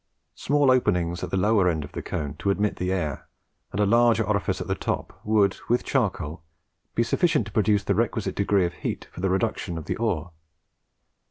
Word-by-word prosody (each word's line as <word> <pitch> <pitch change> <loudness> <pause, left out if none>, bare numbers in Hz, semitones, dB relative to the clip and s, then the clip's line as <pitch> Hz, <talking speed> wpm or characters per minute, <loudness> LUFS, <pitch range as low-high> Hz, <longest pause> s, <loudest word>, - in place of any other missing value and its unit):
Small 145 -1 +2
openings 90 -8 +1
at 90 - -3
the 95 - -1
lower 100 -1 +3
end 80 -3 -1
of 75 - -10
the - - -5
cone 75 -2 -4
to 100 - -1
admit 100 +1 +1
the 90 +1 -1
air, 80 -7 -2 0.4
and 100 - -4
a 105 - +4
larger 115 +1 +4
orifice 105 -2 0
at - - -4
the - - -1
top, - - -4
would, 105 -2 +2
with 120 +1 +2
charcoal, 90 - -1 0.5
be 115 - +3
sufficient 150 - +2
to 105 - -10
produce 105 -1 +2
the - - +1
requisite - - 0
degree 100 -2 +2
of 85 - -3
heat - - -5
for - - -9
the 95 - +1
reduction 95 -3 -1
of 80 - -6
the - - -2
ore. 90 -7 -1
100 Hz, 200 wpm, -25 LUFS, 90-110 Hz, 0.5 s, a